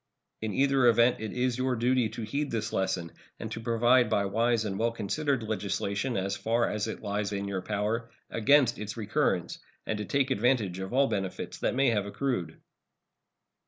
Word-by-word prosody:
In 110 -1 -2
either 135 -2 +4
event 120 +1 +5
it 110 -1 -4
is 125 0 -1
your 130 0 +1
duty 125 0 +2
to 110 +1 -6
heed 140 +7 -2
the 110 -2 -2
lesson 90 -3 -1 0.3
and - - -6
to - - -4
provide 120 +1 +3
by 100 -2 +2
wise 115 +2 +1
and 95 -2 -3
well 115 +1 +2
considered 115 +4 -1
legislation, 100 +2 -2
as 95 +1 -1
far 115 +4 +1
as 105 +1 -2
it 110 - -6
lies 105 0 -2
in 100 0 -3
your 95 -2 -2
power, 105 +4 -2 0.2
against 120 +2 +4
its 105 +1 -5
recurrence, 110 -3 0 0.3
and 110 - -2
to 105 - -3
take 140 +2 +1
advantage 110 -6 +1
of 95 0 -5
all 135 +3 +4
benefits 100 -6 -3
that - - 0
may 135 -2 +3
have 105 -3 0
accrued. 120 -5 -2
110 Hz, 185 wpm, -29 LUFS, 100-125 Hz, 0.3 s, event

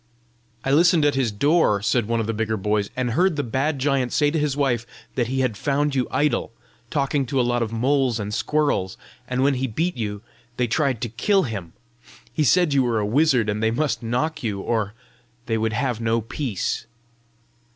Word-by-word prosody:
"I 135 - +1
listened 165 +1 +5
at 145 - +3
his 130 -4 0
door," 140 -1 +3
said 120 -1 +1
one 115 0 0
of 115 - -1
the 115 - -2
bigger 110 0 -1
boys, 105 +1 0
"and 125 -2 -1
heard 180 +7 +2
the 145 - -1
bad 135 +5 -1
giant 135 -2 0
say 145 -1 +2
to 160 - 0
his 145 -2 -1
wife 120 -5 0 0.3
that 120 -3 0
he 130 +2 -1
had 125 -4 0
found 145 +5 0
you 130 -2 0
idle, 145 -7 0 0.4
talking 140 +1 0
to 135 +1 0
a - - +4
lot 120 0 0
of 115 -2 -1
moles 125 0 +1
and 105 0 -4
squirrels, 145 -10 0 0.3
and 125 +1 0
when 140 +1 +3
he 130 0 -1
beat 165 +10 -1
you, 105 -3 -4 0.3
they 125 - +2
tried 130 0 0
to 120 - -2
kill 190 - +2
him. 100 -9 -5 0.6
He 155 - +1
said 170 +1 +3
you 140 - +4
were 120 -3 +1
a 105 - 0
wizard, 125 0 +3
and 105 0 -1
they 110 - +3
must 140 +5 -1
knock 125 +7 -1
you, 105 -5 -2
or 105 0 -1 0.5
they 115 -1 0
would 110 0 0
have 125 -1 -1
no 115 0 +1
peace." 115 -1 -3
125 Hz, 205 wpm, -23 LUFS, 110-145 Hz, 0.6 s, listened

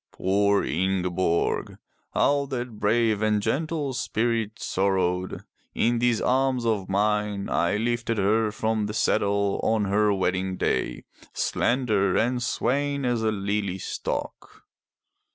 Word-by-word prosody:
Poor 100 +2 +2
Ingeborg! 90 0 0 0.4
How 140 0 +2
that 120 -5 -5
brave 110 0 +2
and 110 -1 +2
gentle 150 +4 -1
spirit 115 -2 -1
sorrowed! 95 -1 -1 0.3
In 120 +1 +2
these 120 -2 +2
arms 130 -1 +1
of 105 -4 0
mine, 105 0 0
I 85 +4 +1
lifted 115 0 -1
her 105 +2 +2
from 110 0 -1
the 105 - -5
saddle 100 -1 +1
on 110 -2 +1
her 105 +2 +2
wedding 95 -1 -1
day, - - -1 0.3
slender 110 -6 +1
and 125 +2 +1
swaying 140 +4 0
as 120 -2 0
a 110 -1 +1
lily 100 -2 -2
stalk. - - -5
105 Hz, 120 wpm, -25 LUFS, 100-120 Hz, 0.4 s, Poor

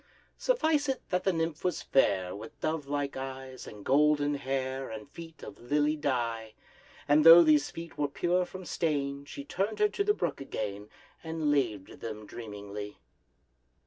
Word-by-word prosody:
Suffice 315 - +2
it 265 - -1
that 180 0 0
the 190 - +4
nymph 165 -2 -2
was 180 -2 -1
fair, 95 -9 +2
With 110 +3 -10
dove 155 -2 -2
like 145 0 -2
eyes, 130 -1 -7
and 105 -1 -11
golden 145 +1 +3
hair, 135 -1 -2
And 110 -1 -7
feet 165 -1 -11
of - - -9
lily 145 +5 +1
dye: 120 -7 -2 0.5
And, 150 +1 +5
though 165 +2 +11
these 150 -2 +4
feet 165 -2 -9
were 145 - +2
pure 175 +5 +1
from 185 +1 -9
stain, 140 -4 -1
She 140 -1 -8
turned 195 +8 -2
her 420 - +3
to 405 - -1
the 415 +1 +2
brook - - -2
again, 105 -5 -5 0.3
And 160 -2 -1
laved 115 -9 -1
them 110 -2 -6
dreamingly. 105 -2 -7
145 Hz, 165 wpm, -30 LUFS, 120-165 Hz, 0.5 s, though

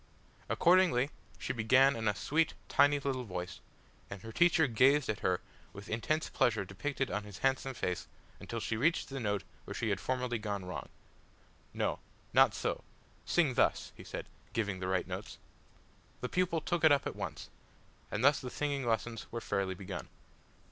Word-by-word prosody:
Accordingly, 170 -7 +4 0.3
she - - -3
began 130 +4 +5
in 110 -1 -2
a 105 - +2
sweet, 160 +8 +1
tiny 145 +1 +5
little 135 -2 -2
voice, 90 -4 -5 0.5
and 100 -2 -8
her 110 - -7
teacher 170 +2 +4
gazed 135 +4 +4
at 105 - -1
her 90 -1 +1 0.3
with 100 +2 -10
intense 155 +8 0
pleasure 110 -4 +1
depicted 135 +8 -3
on 105 - -1
his 105 -2 -9
handsome 135 0 +1
face 90 -5 -2 0.3
until 115 - -5
she 115 - -2
reached 155 +9 +1
the 135 0 -4
note 105 -4 -1 0.2
where - - -6
she - - -1
had - - 0
formerly 125 -2 -1
gone 100 -3 -3
wrong. 90 - -6 0.8
"No - - -1 0.3
not - - +6
so; - - -2 0.4
sing 160 -7 +3
thus," - - +2
he - - -11
said, - - -6 0.3
giving 100 -4 -1
the 90 - -3
right 95 -1 +1
notes. - - -6 0.8
The 125 - -2
pupil 180 -3 +1
took 175 +1 -1
it 160 - +8
up 140 -1 +4
at - - -3
once, - - -6 0.6
and 105 - -2
thus 145 +1 +6
the 125 - -5
singing 140 -2 -2
lessons 115 0 -1
were 115 - -3
fairly 100 -4 -1
begun. 95 0 -6
120 Hz, 175 wpm, -33 LUFS, 105-140 Hz, 0.8 s, it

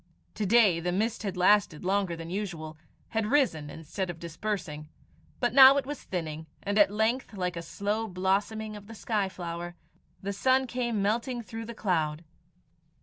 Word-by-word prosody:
To 210 -2 -2
day 210 -5 +5
the 175 +1 -1
mist 220 +5 -1
had 195 -4 -4
lasted 185 -3 +3
longer 190 -2 +1
than 165 0 -7
usual 175 -6 -4 0.3
had 225 -2 -1
risen 215 - +2
instead 165 +5 -5
of 175 - -5
dispersing; 165 -3 -4 0.5
but 245 -2 +1
now 270 +1 +9
it 280 - 0
was 290 0 -5
thinning, 160 -3 -5 0.2
and 205 +1 +1
at 205 - +7
length, 220 +3 0
like 180 -2 -2
a 170 - -4
slow 205 +6 -2
blossoming 205 +3 -1
of 205 -1 -11
the 225 - -10
sky 210 -3 -1
flower, 175 -1 -6 0.4
the 200 +1 -4
sun 260 +6 +3
came 240 -4 -1
melting 235 +4 -1
through 225 +2 -7
the 235 +1 -8
cloud. 160 -6 0
200 Hz, 170 wpm, -28 LUFS, 175-225 Hz, 0.5 s, now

